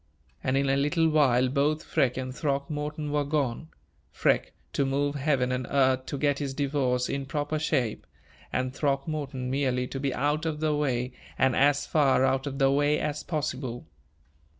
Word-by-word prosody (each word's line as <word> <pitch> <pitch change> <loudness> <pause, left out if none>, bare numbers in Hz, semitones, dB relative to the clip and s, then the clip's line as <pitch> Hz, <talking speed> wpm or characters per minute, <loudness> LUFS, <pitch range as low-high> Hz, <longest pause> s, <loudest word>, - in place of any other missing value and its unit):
And, 130 +1 +1
in 140 0 +1
a 135 - +3
little 150 +4 +2
while, 130 -5 +4
both 145 +4 +1
Freke 125 -2 +1
and 130 0 -4
Throckmorton 150 +1 -2
were 145 0 +1
gone 145 0 -1 0.4
Freke, - - +1 0.2
to 140 - +1
move 140 +1 0
heaven 135 -3 +1
and 125 -1 -2
earth 130 -1 +2
to 140 - -3
get 145 0 +1
his 140 -2 -3
divorce 135 -3 0
in 140 -1 -3
proper 150 +1 -2
shape; 125 - -1 0.4
and 130 0 -1
Throckmorton, 140 -2 -2
merely 130 -2 0
to 135 - -5
be 140 0 -1
out 150 +5 0
of 150 -2 -2
the 155 -1 +1
way, 130 -4 0 0.3
and 130 -2 +3
as 145 +1 +3
far 135 -4 +3
out 135 +1 0
of 135 -1 -4
the 135 -1 +4
way 145 +2 +3
as 150 0 -2
possible. 130 -6 -3
140 Hz, 175 wpm, -27 LUFS, 130-150 Hz, 0.4 s, while